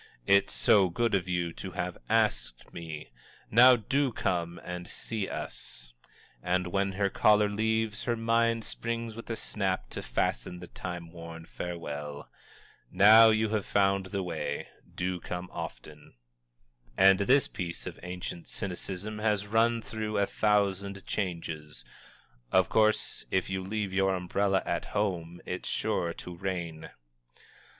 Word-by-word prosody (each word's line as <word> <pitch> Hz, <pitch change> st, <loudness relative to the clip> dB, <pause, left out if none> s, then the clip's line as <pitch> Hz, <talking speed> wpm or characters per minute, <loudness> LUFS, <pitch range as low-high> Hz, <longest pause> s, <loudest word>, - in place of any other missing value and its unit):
"_ -, -, -21 dB, 0.2 s
"It's 100 Hz, 0 st, +4 dB
SO 95 Hz, -3 st, +4 dB
good 115 Hz, +6 st, 0 dB
of 95 Hz, -2 st, +1 dB
you 85 Hz, -2 st, -1 dB
to 95 Hz, +1 st, -7 dB
have 90 Hz, -2 st, -3 dB
asked 110 Hz, -, 0 dB
me!" 80 Hz, -5 st, -7 dB, 0.4 s
"Now, 125 Hz, +3 st, +9 dB
DO 130 Hz, +4 st, 0 dB
come 85 Hz, -3 st, -1 dB
and 90 Hz, 0 st, -6 dB
see 110 Hz, -4 st, -4 dB
us!" -, -, -6 dB, 0.5 s
And 90 Hz, +3 st, +1 dB
when 95 Hz, +2 st, 0 dB
her 100 Hz, +1 st, +1 dB
caller 105 Hz, 0 st, +5 dB
leaves, 110 Hz, 0 st, 0 dB
her 120 Hz, -, +1 dB
mind 115 Hz, 0 st, +2 dB
springs 115 Hz, 0 st, -4 dB
with 115 Hz, +2 st, -10 dB
a 115 Hz, -, -1 dB
snap 95 Hz, -4 st, -2 dB
to -, -, -4 dB
fasten 90 Hz, -, -1 dB
the 90 Hz, -, -8 dB
time 85 Hz, -1 st, -7 dB
worn 85 Hz, -1 st, -9 dB
farewell: 75 Hz, -5 st, -6 dB, 0.6 s
"Now 110 Hz, +3 st, +8 dB
you 110 Hz, 0 st, +2 dB
have 110 Hz, -2 st, 0 dB
found 100 Hz, -1 st, +2 dB
the 95 Hz, 0 st, -2 dB
way, 90 Hz, -, -3 dB, 0.3 s
do 90 Hz, 0 st, -2 dB
come 90 Hz, +1 st, -5 dB
often!" 75 Hz, -2 st, -8 dB, 0.8 s
And 95 Hz, 0 st, +7 dB
this 130 Hz, +7 st, +4 dB
piece 85 Hz, -3 st, -5 dB
of -, -, -7 dB
ancient 90 Hz, -1 st, -6 dB
cynicism 100 Hz, +3 st, -4 dB
has 105 Hz, -2 st, +1 dB
run 115 Hz, +2 st, +2 dB
through 110 Hz, -1 st, -3 dB
a 100 Hz, -, +3 dB
thousand 100 Hz, -2 st, 0 dB
changes: 80 Hz, -, -4 dB, 0.7 s
"_Of 95 Hz, -1 st, +4 dB
course 110 Hz, -1 st, +2 dB
if 95 Hz, 0 st, 0 dB
you 95 Hz, 0 st, -2 dB
leave 100 Hz, 0 st, -3 dB
your 95 Hz, 0 st, +2 dB
umbrella 95 Hz, +2 st, +1 dB
at 85 Hz, -, -1 dB
home 90 Hz, -5 st, -2 dB
it's 90 Hz, -, -4 dB
sure 85 Hz, -2 st, 0 dB
to 90 Hz, +1 st, -8 dB
rain! 85 Hz, -3 st, -4 dB
95 Hz, 145 wpm, -29 LUFS, 90-105 Hz, 0.8 s, Now